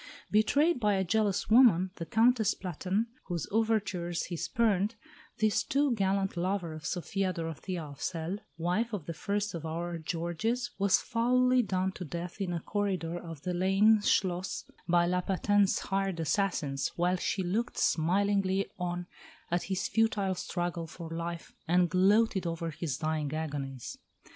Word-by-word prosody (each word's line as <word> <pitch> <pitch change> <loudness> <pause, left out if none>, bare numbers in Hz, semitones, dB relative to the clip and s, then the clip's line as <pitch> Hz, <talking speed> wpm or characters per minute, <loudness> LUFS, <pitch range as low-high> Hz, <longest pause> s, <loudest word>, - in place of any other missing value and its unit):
Betrayed 280 +9 +3
by 210 -3 +2
a 190 - +1
jealous 200 +1 +1
woman, 215 -6 +6
the 165 - -5
Countess 225 +1 +3
Platen, 190 +4 -2 0.2
whose 175 -4 -3
overtures 200 -6 0
he 175 - -5
spurned, 210 +2 +1 0.4
this 215 -1 +2
too 280 -1 +2
gallant 195 -2 0
lover 180 -1 -1
of 155 -1 -6
Sophia 190 +1 -1
Dorothea 165 +1 -4
of 145 -2 -10
Celle, 170 +3 -3 0.2
wife 180 +8 0
of 185 -8 -3
the 165 - -4
first 205 +5 -2
of 165 -2 -5
our 170 +1 -3
Georges, 175 +10 -2
was 200 -1 +4
foully 250 +2 +2
done 190 -3 0
to 190 - -7
death 170 +3 -6
in 185 -2 -1
a 170 -2 -2
corridor 185 -5 -2
of 165 -4 -9
the 180 0 -2
Leine 195 +4 +4
Schloss 185 -2 0 0.2
by 175 0 +4
La 180 +1 +1
Paten's 200 +2 +2
hired 195 -3 -1
assassins, 160 -5 0
while 180 +2 +1
she 190 +1 -1
looked 220 +7 -1
smilingly 195 +3 +1
on 175 0 -2 0.5
at 175 0 +2
his 190 -1 -1
futile 215 -4 +1
struggle 175 -2 -3
for 165 0 -9
life, 170 0 -5
and 175 0 +3
gloated 195 +1 +3
over 165 0 -3
his 150 -3 -3
dying 155 -2 -1
agonies. 140 -5 -5
185 Hz, 155 wpm, -30 LUFS, 170-205 Hz, 0.5 s, woman